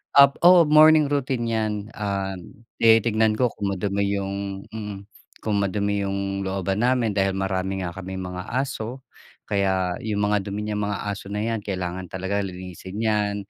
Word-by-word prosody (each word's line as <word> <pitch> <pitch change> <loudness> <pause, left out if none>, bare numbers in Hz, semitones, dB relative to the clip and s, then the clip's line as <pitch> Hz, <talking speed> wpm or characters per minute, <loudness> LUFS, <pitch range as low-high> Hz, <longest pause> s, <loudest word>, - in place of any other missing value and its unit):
Ah, 140 0 +9 0.2
oo, 180 -2 +8
morning 155 -1 +6
routine 130 -4 0
'yan. 110 -2 0 0.2
Um, 100 0 -5 0.2
tinitignan 110 -1 +4
ko 125 0 +1
kung 100 -1 -3
madumi 100 +1 -1
yung 100 0 -4
mm. 105 -3 -6 0.4
Kung 105 -2 0
madumi 100 0 0
yung 100 0 -2
looban 95 +1 -2
namin 120 -2 +2
dahil 95 -1 +1
marami 95 0 -2
nga 85 - -3
kaming 95 +1 -6
mga 90 0 -6
aso 130 -1 -3 0.4
kaya 95 -3 0
yung 105 -2 -1
mga 105 -1 +2
dumi 105 +1 -3
niyang 105 -1 -2
mga 100 - -2
aso 100 0 -7
na 105 - -3
'yan 115 -1 -1
kailangan 90 -2 -4
talaga 95 +2 -2
linisin 95 0 -7
'yan 105 -2 +1
100 Hz, 160 wpm, -24 LUFS, 95-110 Hz, 0.4 s, Ah